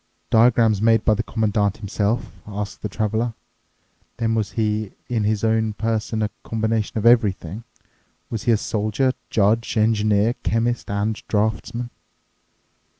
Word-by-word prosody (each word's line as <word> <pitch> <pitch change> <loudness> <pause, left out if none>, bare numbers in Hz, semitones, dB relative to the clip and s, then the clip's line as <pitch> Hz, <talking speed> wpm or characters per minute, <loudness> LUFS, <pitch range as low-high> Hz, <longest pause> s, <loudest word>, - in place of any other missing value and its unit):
"Diagrams 110 -2 +4
made 115 -1 +3
by 110 - +5
the 105 - 0
Commandant 105 -3 0
himself?" 105 +2 -1 0.2
asked 105 0 -5
the 105 - -3
Traveler. 110 +3 -1 0.8
"Then 115 -2 0
was 110 -2 -1
he 110 -2 -1 0.2
in 115 -4 0
his 105 0 0
own 110 -1 +1
person 110 0 -1
a 105 - -1
combination 110 -1 -1
of 110 - -1
everything? 110 -3 +2 0.7
Was 115 -2 -4
he 120 -2 +4
soldier, 110 +5 0 0.2
judge, 110 +3 +1
engineer, 110 0 +3
chemist, 115 +1 0
and 100 +2 0
draftsman?" 110 +3 -1
110 Hz, 130 wpm, -22 LUFS, 105-115 Hz, 0.8 s, by